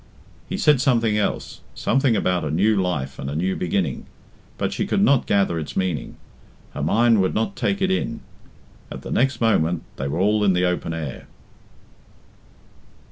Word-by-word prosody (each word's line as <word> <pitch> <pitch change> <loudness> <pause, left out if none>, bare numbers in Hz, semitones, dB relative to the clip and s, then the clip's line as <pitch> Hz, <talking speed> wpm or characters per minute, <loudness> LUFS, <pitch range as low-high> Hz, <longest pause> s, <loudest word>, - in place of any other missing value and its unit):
He - - -2
said 150 -4 +4
something 115 -6 +2
else 105 - -2
something 135 -3 +2
about 90 -4 0
a 75 - -2
new 100 +8 +2
life 90 -9 -2
and 70 - -4
a 70 - -4
new 90 +4 0
beginning 90 - -2 0.5
but - - -1
she - - -2
could 200 - +1
not 140 - +3
gather 95 -4 +2
its 75 - -6
meaning, 90 -8 -2 0.6
her - - -5
mind 115 +7 +3
would 95 - 0
not 110 -2 -1
take 195 -1 -1
it 190 - +2
in. 115 -11 -2 0.7
At - - -8
the - - -7
next 130 -1 +1
moment 90 -7 +2
they 70 - -3
were 75 +4 -3
all 105 +2 +2
in 100 -2 +4
the 90 0 +2
open 90 -2 -1
air. 75 -5 -6
95 Hz, 175 wpm, -22 LUFS, 85-115 Hz, 0.7 s, said